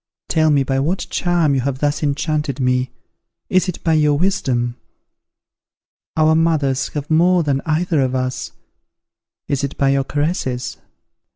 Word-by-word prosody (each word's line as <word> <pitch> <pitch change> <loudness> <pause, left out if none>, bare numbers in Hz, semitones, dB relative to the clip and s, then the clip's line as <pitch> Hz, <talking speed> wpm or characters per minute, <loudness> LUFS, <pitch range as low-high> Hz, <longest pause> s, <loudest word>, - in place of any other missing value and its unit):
Tell 160 -2 +3
me 145 -2 +3
by 135 0 -1
what 165 +8 -1
charm 175 -4 +1
you 135 - +1
have 135 +1 -2
thus 145 +1 -1
enchanted 150 -1 -1
me! 125 0 +1 0.6
Is 185 0 +2
it 180 - -6
by 165 - +2
your 150 -2 +3
wisdom? 130 -10 0 1.4
Our 155 0 +4
mothers 155 -5 +1
have 145 +1 -4
more 175 +2 +4
than 140 -2 0
either 160 -1 +1
of 130 0 0
us. 130 0 -3 1.0
Is 140 -1 -1
it 140 - -3
by 140 - +2
your 135 0 +2
caresses? 145 -4 -2
145 Hz, 150 wpm, -19 LUFS, 135-160 Hz, 1.4 s, Our